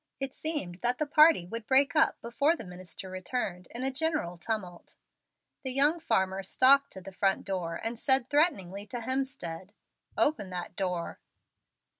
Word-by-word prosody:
It 270 -1 -4
seemed 290 - -3
that 245 +1 +1
the 305 - -1
party 305 - +5
would 225 +4 -7
break 265 -1 +4
up, - - +3
before 280 +8 +1
the 230 - -8
minister 180 0 -8
returned, 185 -1 -4
in 240 +2 -4
a 265 - 0
general 295 - -1
tumult. 180 -2 -5 0.7
The 260 - -3
young 290 +5 +4
farmer 190 -9 0
stalked 270 +8 +4
to 190 - -9
the 195 +2 -10
front 195 +1 0
door, 180 -4 -3
and 225 +4 -4
said 265 -2 +3
threateningly 205 - 0
to 245 0 -6
Hemstead, 225 -8 -3 0.4
"Open 285 -11 +2
that 180 -1 -6
door." 180 -3 -3
225 Hz, 160 wpm, -29 LUFS, 185-275 Hz, 0.7 s, party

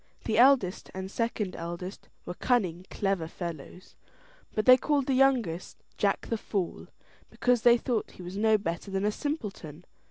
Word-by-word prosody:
The 220 0 +1
eldest 245 -8 +4
and 190 0 -5
second 225 -4 -2
eldest 175 +3 -7 0.2
were 175 - -5
cunning 185 -5 0
clever 195 -5 -1
fellows, 170 0 -8 0.6
but 215 - 0
they 255 - +10
called 280 +1 0
the 270 - 0
youngest 250 -10 +1 0.2
Jack 200 -1 0
the 230 - -2
Fool, 195 -5 -3 0.4
because 245 -2 +1
they 240 0 +6
thought 235 -2 -2
he 180 - -11
was 180 +2 -7
no 215 +1 +3
better 170 0 -4
than 195 +1 -1
a 210 - +2
simpleton. 200 - -5
205 Hz, 160 wpm, -28 LUFS, 180-240 Hz, 0.6 s, they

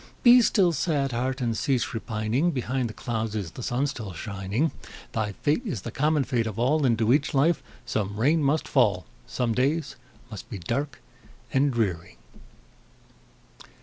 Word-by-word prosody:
Be 245 0 +8
still, 195 -6 +3
sad 145 -3 0
heart! 130 +3 -2
and 115 -2 0
cease 130 -1 0
repining; 115 +7 0
Behind 130 -4 -1
the - - -7
clouds 110 -2 -3
is 95 -6 -3
the - - -9
sun 125 +3 0
still 115 -9 -5
shining; 100 - -2 0.4
Thy 105 -2 -2
fate 145 - 0
is 140 - -4
the 115 - -5
common 150 +2 +2
fate 120 -3 0
of 110 -1 -5
all, 135 +4 +2
Into 115 0 +3
each 145 +1 +1
life 160 +6 +3 0.2
some 100 -1 -2
rain 150 +7 +3
must 145 +2 +1
fall, 105 -9 +2 0.2
Some 120 -2 -1
days 140 +6 0 0.3
must 110 +2 -8
be 110 - -5
dark 125 - -3 0.5
and 140 +1 +3
dreary. 90 - -2
125 Hz, 160 wpm, -26 LUFS, 110-145 Hz, 0.5 s, Be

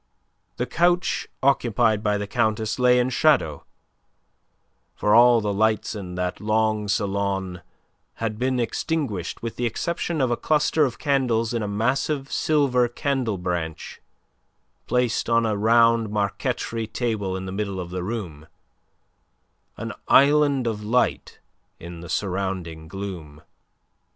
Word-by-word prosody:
The 125 - -1
couch 175 +7 +1 0.2
occupied 120 -5 +2
by 105 -1 +1
the 105 - -3
Countess 110 0 -1
lay 125 0 +5
in 125 +1 +1
shadow; 125 - +2 1.3
for 105 - +1
all 120 0 +6
the 105 -1 -1
lights 110 +1 +1
in 95 -4 -7
that 90 0 -3
long 110 0 +1
salon 100 -3 -1 0.5
had 110 -1 -4
been 130 0 0
extinguished 120 - -2
with 115 - -5
the 120 - 0
exception 170 +7 -2
of 130 -3 +1
a - - +2
cluster 150 0 +2
of 125 -3 -4
candles 125 -5 0
in 115 - -1
a 105 - -2
massive 135 +7 -1
silver 135 -5 +2
candle 120 -3 -2
branch 85 -3 -4 0.9
placed 125 -2 0
on 115 0 +3
a 110 -1 0
round 115 +1 +3
marquetry 105 +2 -2
table 110 -5 -2
in 95 - -6
the 95 - -5
middle 100 -1 -3
of 90 -1 -6
the 90 0 -3
room 90 -7 -5 1.3
an - - -5
island 140 -2 +4
of 110 -2 -2
light 120 +4 0 0.4
in 85 0 -9
the 85 0 -10
surrounding 95 -5 -3
gloom. 85 -5 -7
110 Hz, 135 wpm, -24 LUFS, 100-125 Hz, 1.3 s, all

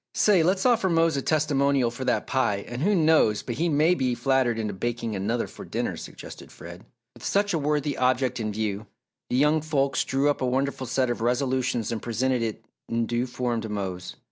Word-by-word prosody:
"Say, 200 -5 +4
let's 185 +3 +1
offer 235 -6 +3
Mose 165 -2 +3
a 140 - -1
testimonial 140 -4 +1
for 125 +2 -6
that - - +1
pie 105 -7 0
and 120 +2 -5
who 200 +5 +3
knows 155 - +3
but 120 - -4
he 170 +2 +1
may 155 +3 +3
be 130 -7 0
flattered 130 -3 +1
into 105 -2 -2
baking 115 +2 -3
another 110 +5 -1
for - - -11
dinner," - - -3
suggested - - -10
Fred. 85 +3 -11 0.3
With - - -16
such 205 0 +1
a 165 - +1
worthy 145 -1 0
object 130 0 +1
in 110 -1 -2
view, 105 0 -3 0.4
the 125 - 0
young 150 +3 +3
folks 140 -3 0
drew 135 +2 0
up 145 - +1
a 130 - +1
wonderful 135 +1 -1
set 130 +1 +1
of 120 - -4
resolutions 125 -1 0
and 115 - -3
presented 125 +2 0
it 115 -2 -4 0.2
in 115 0 0
due 120 +2 -1
form 120 -2 -2
to 110 - -6
Mose. 95 -3 -4
130 Hz, 205 wpm, -25 LUFS, 115-145 Hz, 0.4 s, Say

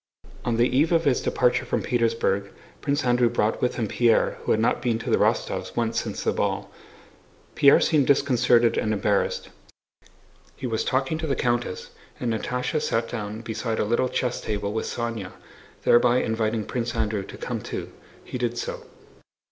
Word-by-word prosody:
On 120 -2 0
the 120 +1 +4
eve 145 +7 +2
of 165 -1 +3
his 135 -3 +2
departure 125 -1 +1
from - - -2
Petersburg 115 -5 0 0.3
Prince 145 0 0
Andrew 120 -1 +3
brought 110 -2 0
with 125 - 0
him 115 -3 -1
Pierre, 115 +1 +2
who - - -1
had 110 - +3
not 115 - +1
been 120 -3 +1
to 115 - -4
the - - +4
Rostóvs' - - 0
once 115 -1 0
since - - -5
the - - +1
ball. - - -2 0.8
Pierre 140 - +6
seemed 150 -5 +2
disconcerted 125 -4 +3
and 110 - 0
embarrassed. 100 -1 0 1.1
He - - -7
was 115 -3 -1
talking 135 +4 0
to 160 - -3
the 140 - 0
countess, 120 -5 -2 0.3
and 120 -2 -1
Natásha 125 +7 -2
sat 115 0 -1
down 105 -1 -5
beside 110 0 -3
a - - +1
little 120 +4 +1
chess 125 -1 -1
table 105 -1 -3
with 110 - -2
Sónya, 115 -5 -4 0.5
thereby 120 +1 +5
inviting 110 -1 -1
Prince 120 -2 -3
Andrew 110 -2 0
to 95 - -10
come - - -4
too. - - -6 0.3
He 125 - -6
did 120 -1 -1
so. - - -5
120 Hz, 175 wpm, -25 LUFS, 110-125 Hz, 1.1 s, Pierre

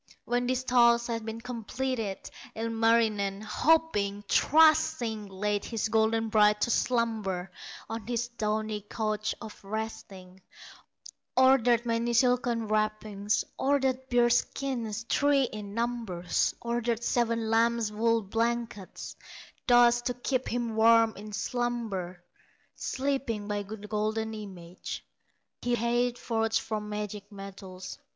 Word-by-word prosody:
When 245 0 0
this 255 0 0
task 235 -2 +4
had 230 -1 -3
been 225 +1 -5
completed, 235 -2 -3 0.4
Ilmarinen, 225 -3 +1
hoping, 210 -5 +1
trusting, 310 -9 +3
Laid 205 +1 -2
his 225 -1 -2
golden 225 0 +2
bride 210 -1 +4
to 235 - +2
slumber, 215 -8 0 0.4
On 225 -2 -6
his 240 0 -1
downy 215 -2 -2
couch 215 0 -2
of 220 -3 -10
resting; 195 -3 -6 1.0
Ordered 245 -3 +5
many 230 0 0
silken 240 -1 +2
wrappings, 215 -1 0 0.2
Ordered 265 -1 +1
bear 240 -1 +4
skins, 235 -3 -1
three 285 -1 +3
in 210 -4 -5
number, 230 -7 -3 0.4
Ordered 235 0 -1
seven 230 -2 0
lambs 230 -1 +2
wool 230 +1 +1
blankets, 230 -1 -3 0.5
Thus 240 -1 +6
to 245 0 -2
keep 255 +1 -1
him 235 -2 -2
warm 225 0 +5
in 210 +1 -9
slumber, 210 -6 -3 0.5
Sleeping 260 -6 -2
by 205 -1 -1
the 205 +2 -7
golden 220 +1 -1
image 185 -5 -8 0.6
Re 245 0 +1
had 240 +1 +1
forged 225 -2 0
from 210 -1 -4
magic 210 0 -5
metals. 195 -2 -9
225 Hz, 115 wpm, -29 LUFS, 210-240 Hz, 1.0 s, Thus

